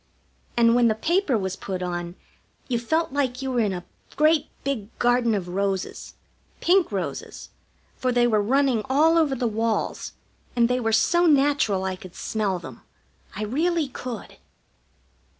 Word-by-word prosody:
And 230 Hz, -1 st, +5 dB
when 240 Hz, 0 st, +4 dB
the 220 Hz, -, +2 dB
paper 315 Hz, -, +1 dB
was 190 Hz, -2 st, -3 dB
put 185 Hz, -1 st, -5 dB
on 175 Hz, -1 st, -4 dB, 0.5 s
you 240 Hz, -3 st, 0 dB
felt 315 Hz, +5 st, 0 dB
like 270 Hz, -2 st, -1 dB
you 265 Hz, -, -2 dB
were 245 Hz, -, 0 dB
in 210 Hz, -3 st, +2 dB
a 180 Hz, -1 st, -5 dB, 0.3 s
great 310 Hz, +1 st, +3 dB, 0.2 s
big 265 Hz, -7 st, -2 dB
garden 240 Hz, -2 st, +2 dB
of 185 Hz, -3 st, -3 dB
roses; 195 Hz, +1 st, -3 dB, 0.4 s
pink 365 Hz, -4 st, +3 dB
roses, 195 Hz, -2 st, -5 dB, 0.5 s
for 255 Hz, -, 0 dB
they 240 Hz, 0 st, +3 dB
were 215 Hz, -3 st, +3 dB
running 260 Hz, +1 st, +2 dB
all 310 Hz, +5 st, +4 dB
over 310 Hz, -5 st, +3 dB
the 245 Hz, -, -2 dB
walls, 225 Hz, 0 st, -2 dB, 0.4 s
and 235 Hz, -1 st, +4 dB
they 250 Hz, +1 st, 0 dB
were 225 Hz, -2 st, 0 dB
so 345 Hz, +10 st, +3 dB
natural 280 Hz, -, +3 dB
I 190 Hz, -1 st, -2 dB
could 185 Hz, -1 st, -12 dB
smell 205 Hz, -4 st, -1 dB
them. 130 Hz, -9 st, -10 dB, 0.5 s
I 210 Hz, -, -3 dB
really 310 Hz, +6 st, 0 dB
could. 250 Hz, -3 st, -7 dB
240 Hz, 160 wpm, -24 LUFS, 200-275 Hz, 0.5 s, And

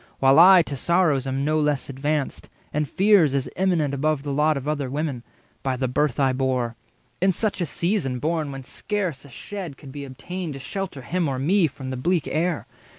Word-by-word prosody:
While 135 Hz, +3 st, +5 dB
I 180 Hz, 0 st, +9 dB
to 145 Hz, -, -5 dB
sorrows 155 Hz, -3 st, +2 dB
am 135 Hz, +1 st, -1 dB
no 155 Hz, +1 st, +2 dB
less 150 Hz, -2 st, 0 dB
advanced, 140 Hz, +1 st, -2 dB, 0.2 s
And 150 Hz, -1 st, -1 dB
fears 190 Hz, -8 st, +4 dB
as 135 Hz, -, 0 dB
eminent 170 Hz, -6 st, +1 dB
above 145 Hz, 0 st, 0 dB
the 145 Hz, -1 st, -3 dB
lot 150 Hz, +2 st, +3 dB
70 -, -, -2 dB
Of 140 Hz, +1 st, -5 dB
other 145 Hz, -3 st, -1 dB
women, 140 Hz, -3 st, -2 dB, 0.4 s
by 130 Hz, -1 st, -1 dB
the 130 Hz, 0 st, 0 dB
birth 135 Hz, +1 st, 0 dB
I 135 Hz, -2 st, +3 dB
bore: 130 Hz, -3 st, -1 dB, 0.5 s
In 190 Hz, +1 st, +4 dB
such 205 Hz, +1 st, -1 dB
a 175 Hz, -, 0 dB
season 170 Hz, -5 st, 0 dB
born, 155 Hz, +2 st, -1 dB
when 135 Hz, -1 st, -7 dB
scarce 180 Hz, -2 st, -3 dB
a -, -, -13 dB
shed 175 Hz, +1 st, -7 dB
Could 135 Hz, -, -11 dB
be 145 Hz, +1 st, -7 dB
obtained 155 Hz, +6 st, -6 dB
to 135 Hz, -, -7 dB
shelter 180 Hz, -2 st, -5 dB
him 175 Hz, +3 st, -1 dB
or 135 Hz, -, -2 dB
me 170 Hz, +6 st, +3 dB
From 135 Hz, -2 st, -7 dB
the 130 Hz, -, -3 dB
bleak 170 Hz, +4 st, 0 dB
air? 170 Hz, +1 st, -1 dB
150 Hz, 210 wpm, -24 LUFS, 135-170 Hz, 0.5 s, I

